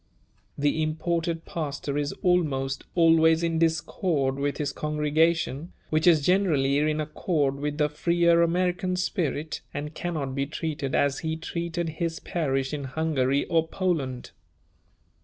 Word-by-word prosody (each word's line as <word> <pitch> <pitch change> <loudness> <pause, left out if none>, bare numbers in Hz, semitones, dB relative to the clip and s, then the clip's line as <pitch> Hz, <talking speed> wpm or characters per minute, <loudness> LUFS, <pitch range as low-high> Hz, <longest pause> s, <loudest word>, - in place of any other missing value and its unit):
The 145 +2 +1
imported 165 +1 -1
pastor 145 -3 -4
is 145 0 -1
almost 145 -7 +1
always 165 -1 +5
in 165 -1 0
discord 160 -4 0
with 140 0 -1
his 145 -2 -1
congregation, 150 0 0 0.2
which 155 +2 +2
is 155 -5 +5
generally 155 -8 +3
in 155 +1 +1
accord 150 -2 -1
with 145 0 -3
the 150 -1 +3
freer 170 +2 +3
American 180 +2 +1
spirit 160 -4 -2
and 150 +2 -4
cannot 155 -6 -3
be 140 +1 -1
treated 145 -3 -3
as 140 -1 +2
he 160 0 -3
treated 170 +1 -3
his 165 -1 -1
parish 135 -5 -1
in 145 -2 -3
Hungary 140 -1 0
or 165 -1 +1
Poland. 160 -9 -2
155 Hz, 135 wpm, -26 LUFS, 145-170 Hz, 0.2 s, always